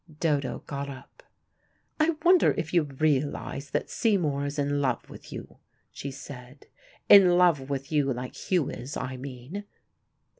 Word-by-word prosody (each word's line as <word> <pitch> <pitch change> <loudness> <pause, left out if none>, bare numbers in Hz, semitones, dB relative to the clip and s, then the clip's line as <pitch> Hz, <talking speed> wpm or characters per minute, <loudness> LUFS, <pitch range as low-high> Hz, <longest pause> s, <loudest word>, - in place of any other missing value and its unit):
Dodo 145 -5 0
got 140 0 -4
up. 130 -1 -11 0.8
"I 315 +1 +3
wonder 360 0 +6
if 155 - -3
you 175 - +5
realize 145 -1 -1
that 145 - -2
Seymour 155 -11 +1
is 145 +1 -5
in 145 0 0
love 130 -4 -1
with - - -12
you," - - -9 0.3
she 140 - -6
said. 135 -1 -10 0.4
"In 185 -3 +8
love 165 -7 +3
with 140 0 -4
you 145 -3 +2
like 125 0 -4
Hugh 180 -7 0
is, 130 +4 -6
I 130 0 -4
mean." 130 +8 -7
145 Hz, 150 wpm, -27 LUFS, 135-165 Hz, 0.8 s, In